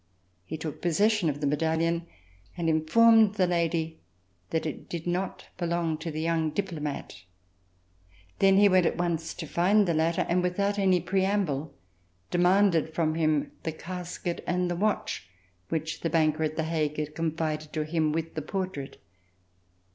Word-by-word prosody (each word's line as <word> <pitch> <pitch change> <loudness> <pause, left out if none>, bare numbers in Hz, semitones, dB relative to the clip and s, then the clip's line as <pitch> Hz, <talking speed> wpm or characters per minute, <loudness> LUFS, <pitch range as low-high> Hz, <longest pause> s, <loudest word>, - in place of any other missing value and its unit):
He 160 - -5
took 155 -1 -6
possession 200 +1 +2
of 145 0 -4
the - - 0
medallion 165 +3 0 0.5
and 170 -2 -1
informed 210 +7 +5
the 190 -3 +3
lady 165 -2 -1 0.5
that 160 - -1
it 155 - -6
did 170 -2 -5
not 180 +2 -2
belong 170 -2 -1
to 165 - -4
the 155 0 -4
young 165 -1 +1
diplomat. 150 - -4 1.2
Then 195 0 +5
he 205 +1 +7
went 185 -3 +4
at - - -1
once 170 -2 -2
to 165 - -6
find 195 +6 +3
the 170 - +2
latter 160 +1 +1
and, 180 +1 +2
without 200 +3 0
any 185 -3 +3
preamble, 185 -6 0 0.6
de 175 - +1
manded 175 -4 +3
from 160 -2 +1
him 155 -2 +1
the 160 - -2
casket 175 0 -5
and 180 0 0
the - - -1
watch 200 - -1 0.4
which 160 0 -2
the 165 - 0
banker 155 -1 +2
at 155 0 0
The 160 - -1
Hague 155 -2 -1
had 150 0 -3
confided 155 -1 -2
to 155 - 0
him 155 -1 +1
with 165 +1 -3
the 155 - -3
portrait. 185 -4 -4
165 Hz, 160 wpm, -28 LUFS, 155-180 Hz, 1.2 s, he